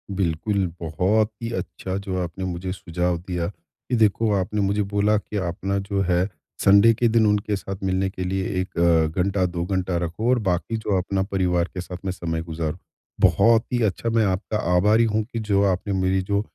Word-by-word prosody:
बिल्कुल। 95 +2 0 0.2
बहुत 95 +7 +1
ही 115 - -3
अच्छा 95 0 -4
जो 95 -2 -2
आपने 90 +2 -5
मुझे 90 0 -4
सुझाव 90 -1 -2
दिया, 90 -2 -1 0.4
कि 125 - +2
देखो 110 0 +2
आपने 100 +2 -1
मुझे 100 +1 +1
बोला 105 +1 +1
कि 105 0 -5
आप 90 -2 -2
ना 100 0 +1
जो 100 0 -2
है, 90 0 +1 0.4
संडे 100 +4 +7
के 120 +2 +1
दिन 115 -1 +3
उनके 105 0 +1
साथ 95 0 -6
मिलने 95 0 0
के 95 -1 -5
लिए 95 +1 -1 0.2
1 95 -1 -7
अ, 85 -2 +4
घंटा, 95 0 +1
2 85 -1 -2
घंटा 95 -1 -1
रखो 90 +9 -2
और 125 -1 +4
बाकी 90 +6 -1
जो 105 -3 0
आप 95 +2 -3
ना 95 0 +2
परिवार 90 -3 0
के 90 - -4
साथ 90 0 -7
में 95 - 0
समय 80 -2 -3
गुज़ारो। 80 -2 -4 0.4
बहुत 110 +6 +5
ही 120 - +1
अच्छा 110 +2 0
मैं 115 -1 +2
आपका 95 +3 -1 0.2
आभारी 105 +5 +4
हूँ, 110 -1 +1
कि 115 +1 -6
जो 100 -2 +1
आपने 95 +2 -2
मेरी 95 +1 +2
जो 100 +2 0
95 Hz, 205 wpm, -23 LUFS, 90-105 Hz, 0.4 s, संडे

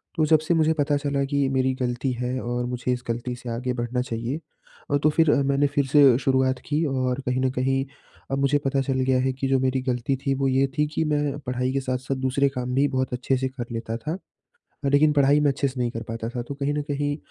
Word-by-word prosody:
तो 160 -3 +2
जब 155 0 +5
से 155 +3 0
मुझे 160 -1 +3
पता 145 -1 +1
चला 140 -1 -1
कि 140 0 +1
मेरी 130 -1 +1
गलती 125 +1 -1
है 125 +1 -1
और 120 +1 -2
मुझे 125 0 -2
इस 125 0 -5
गलती 120 +1 -3
से 120 0 -8
आगे 125 +2 -2
बढ़ना 120 0 -2
चाहिए 120 +3 -3 0.5
अ, 145 - +4
तो 150 +2 +3
फिर 160 0 +3
मैंने 140 +1 +2
फिर 140 0 0
से 135 -3 +6
शुरुआत 130 -1 +1
की 150 +2 0
और 130 -2 -1
कहीं 125 +1 0
न 130 - +2
कहीं 135 +1 0 0.5
अब 135 - +1
मुझे 140 +1 +3
पता 135 0 +1
चल 135 -1 -1
गया 130 0 +2
है, 130 +1 +1
कि 135 +1 -2
जो 135 0 +3
मेरी 130 0 0
गलती 125 0 -1
थी, 135 +1 -1
वो 135 0 0
ये 135 +1 +3
थी 150 - +3
कि 160 - +1
मैं 145 -1 0
पढ़ाई 125 -1 -2
के 135 - +1
साथ-साथ 130 +1 -2
दूसरे 140 +2 +2
काम 125 -2 -4
भी 140 +2 +4
बहुत 130 -2 -1
अच्छे 125 +2 0
से 130 +1 -1
कर 130 -2 -6
लेता 115 -1 -4
था। 155 +8 -4 0.7
लेकिन 145 +2 +4
पढ़ाई 145 0 +4
मैं 145 -1 +3
अच्छे 140 +1 0
से 130 -1 -6
नहीं 120 -1 0
कर 115 0 -5
पाता 115 0 -4
था, 120 0 -4
तो 120 +4 -6
कहीं 140 +1 -1
न 150 - -1
कहीं 145 0 -1
135 Hz, 245 wpm, -24 LUFS, 125-140 Hz, 0.7 s, से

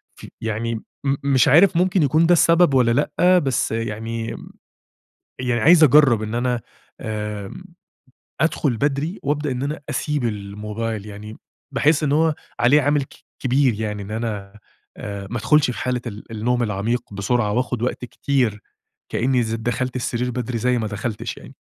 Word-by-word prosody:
ف - - -12 0.2
يعني 115 +1 -2
م 135 +5 -4
مش 135 -3 +3
عارف 170 +5 +6
ممكن 185 -2 +2
يكون 155 +4 +3
ده 175 - +5
السبب، 170 -2 +4
والّا 125 -3 +4 0.3
لأ. 180 +1 +5
بس 135 -8 0
يعني 115 +1 -4 1.1
يعني 125 -2 0
عايز 165 0 +7
أجرّب 135 -6 +5
إن 110 +1 -4
أنا 120 0 0 0.4
آآ 105 -2 -5 0.9
أدخل 150 -5 +1
بدري، 145 - -1
وأبدأ 145 -1 -1
إن 125 +1 -4
أنا 145 +2 -3
أسيب 150 -4 -1
الموبايل، 105 +1 -4
يعني 105 +1 -9 0.4
باحس 150 +1 +2
إن 140 - +1
هو 160 0 +3 0.3
عليه 140 +5 +5
عامل 145 0 +2
ك - - -18 0.3
كبير 130 -2 +2
يعني 105 -2 -3
إن 100 - -9
أنا، 105 -2 -4 0.4
آآ، 100 -1 -6
ما 120 - -3
ادخُلش 150 +4 +3
في 125 - -6
حالة 125 -1 -1
ال 105 -2 -7
النوم 120 +3 0
العميق 105 +1 -2
بسرعة، 105 +2 0
وآخد 125 0 -1
وقت 125 0 -2
كتير 120 -6 -1 0.5
كأني 125 0 +1
ز 110 0 -2
دخلت 125 +3 -2
السرير 125 0 -2
بدري، 120 -1 -3
زي 125 +2 +1
ما 110 - -2
دخلتش 105 +1 -4
يعني. - - -13
120 Hz, 160 wpm, -21 LUFS, 110-140 Hz, 1.1 s, عايز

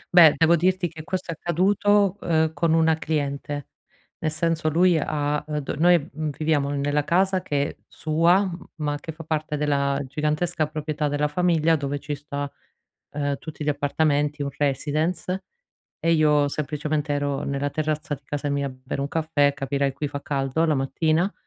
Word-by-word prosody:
Beh, 160 -4 +9
devo 165 +2 +5
dirti 180 +1 +1
che 160 -1 -9
questo 185 -1 -3
è - - -2
accaduto, 195 +4 +2
uhm, 160 -1 +1
con 165 -1 +1
una 160 -1 +3
cliente. 145 -2 -3 0.5
Nel 155 - 0
senso 160 0 0
lui 175 +3 +4
ha, 150 0 -1
uhm, 150 -1 -2
d 145 - -5
noi, 175 -2 +4
mhmm, 155 +1 -2
viviamo 150 -3 +1
nella 145 +1 0
casa 185 +3 +2
che 145 -4 -2
sua, 170 +5 +2 0.3
ma 145 -2 -2
che 160 - -6
fa 160 +1 -10
parte 155 -1 -2
della 140 -1 +1
gigantesca 150 +3 -1
proprietà 155 0 -2
della 145 +1 0
famiglia 165 0 +2
dove 145 -1 -2
ci 145 +1 -5
sta, 145 0 -4 0.6
ehm, 145 -1 -1
tutti 155 +2 -8
gli 150 - 0
appartamenti, 145 0 +1
un 140 - -1
residence, 155 +6 -1 0.6
e 165 - +1
io 150 -3 +4
semplicemente 150 0 -2
ero 145 -1 -1
nella 140 0 -2
terrazza 155 0 -2
di 140 - -6
casa 145 +1 -3
mia 140 0 0
a - - -5
bere 130 +1 -5
un 140 - -1
caffè, 150 -2 +1
capirai, 140 0 -1
qui 140 +2 -3
fa 145 0 -6
caldo 135 +2 -1
la 155 -2 +2
mattina. 155 +7 +1
150 Hz, 170 wpm, -24 LUFS, 145-165 Hz, 0.6 s, Beh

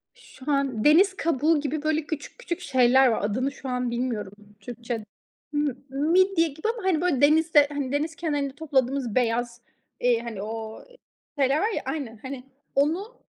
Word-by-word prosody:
Şu 280 +3 -7
an, 275 -6 0
deniz 375 +6 +5
kabuğu 320 -1 +2
gibi 295 +1 -3
böyle 310 0 0
küçük 315 +9 -6
küçük 345 -8 -4
şeyler 260 0 +4
var. 230 - +1
Adını 255 +7 0
şu 275 -1 -8
an 250 -1 -1
bilmiyorum 235 -5 -3 0.3
Türkçe. 235 0 -6 0.5
M 295 -3 +1 0.2
midye 335 +5 +3
gibi 315 +7 -5
ama, 460 - -9
hani, 335 -3 +2
böyle 315 -8 +1
denizde, 300 0 +5
hani 285 -3 -3
deniz 310 +3 -1
kenarında 290 -5 -2
topladığımız 270 -5 0
beyaz, 240 0 0 0.4
eee, 245 -2 +3
hani 230 -4 -6
o 220 - -6 0.5
şeyler 275 +1 +3
var 430 +3 +1
ya - - -2
Aynen. 245 -8 -4
Hani 260 -1 -6 0.3
onu 355 - 0
280 Hz, 160 wpm, -25 LUFS, 245-315 Hz, 0.5 s, deniz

